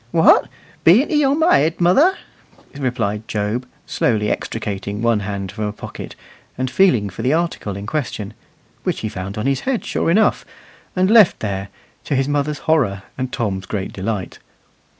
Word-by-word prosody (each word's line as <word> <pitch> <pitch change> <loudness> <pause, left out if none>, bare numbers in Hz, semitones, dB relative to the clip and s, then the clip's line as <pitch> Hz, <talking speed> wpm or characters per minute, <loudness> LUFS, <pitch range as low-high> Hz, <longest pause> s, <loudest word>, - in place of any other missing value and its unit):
"What! 160 +5 +5 0.3
bean't 210 - +5
'ee 300 -1 +3
on 275 +1 +2
ma 325 +2 +3
head, 155 +4 +3
mother?" 275 - +4 0.6
replied 115 -6 -2
Job, 110 +4 -2 0.2
slowly 105 -3 0
extricating 105 -1 -4
one 115 -2 +3
hand 100 -2 -4
from 105 +1 -4
a 105 - -2
pocket, 105 - -9 0.4
and 130 0 -2
feeling 130 - +3
for 100 +3 -7
the 130 +5 +2
article 160 - -2
in 100 - -6
question; 110 -6 -3 0.5
which - - -2
he 110 - -2
found 100 -1 -6
on 105 - -2
his 135 -1 +1
head 260 - -2
sure - - -1
enough, 210 +5 +3 0.5
and 185 +2 +2
left 220 -5 +6
there, 100 -2 -3 0.4
to 145 - -1
his 135 0 +1
mother's 145 +1 0
horror 120 -12 +1
and 130 -1 -3
Tom's 95 -4 -2
great 100 -2 -4
delight. 100 -1 -4
120 Hz, 170 wpm, -20 LUFS, 105-160 Hz, 0.6 s, left